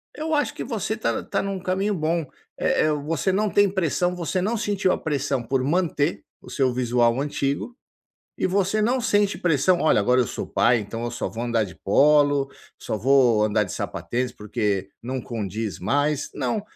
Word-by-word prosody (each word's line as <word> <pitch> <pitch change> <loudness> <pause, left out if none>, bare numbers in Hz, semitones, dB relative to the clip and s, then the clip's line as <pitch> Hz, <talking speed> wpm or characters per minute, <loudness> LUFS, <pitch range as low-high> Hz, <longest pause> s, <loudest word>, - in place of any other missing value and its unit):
eu 315 +1 -1
acho 290 -6 0
que - - -5
você 220 -3 -2
está 220 - -1
está - - -2
num 195 -1 -3
caminho 190 +3 -1
bom. 165 0 0 0.3
Eh - - +2
eh - - +2
você 150 +4 -1
não 210 +2 +1
tem 205 0 +4
pressão, 180 -1 0
você 180 +1 -2
não 215 +5 0
sentiu 200 -3 0
a - - +1
pressão 140 -3 -1
por 130 +2 -1
manter 160 0 0 0.2
o - - -13
seu 130 -3 +1
visual 120 -1 +2
antigo 145 - -2 0.6
e - - 0
você 200 +3 +1
não 250 +4 +1
sente 205 -4 +1
pressão: 175 +2 +2
“Olha, 155 - +4
agora 125 +5 +3
eu 120 - +1
sou - - -5
pai, 120 0 +3
então 115 +3 -5
eu 120 - -2
só 120 - -3
vou 115 +1 -5
andar 115 -2 +1
de 90 - -10
polo, 145 +4 +3 0.3
só 110 - -4
vou 120 -2 +4
andar 105 0 +2
de 90 - -7
sapatênis 125 +1 -3
porque 105 -2 -2
não 130 +2 -3
condiz 110 -3 -4
mais”, 145 +7 0
não. 140 - -1
145 Hz, 190 wpm, -24 LUFS, 120-185 Hz, 0.6 s, tem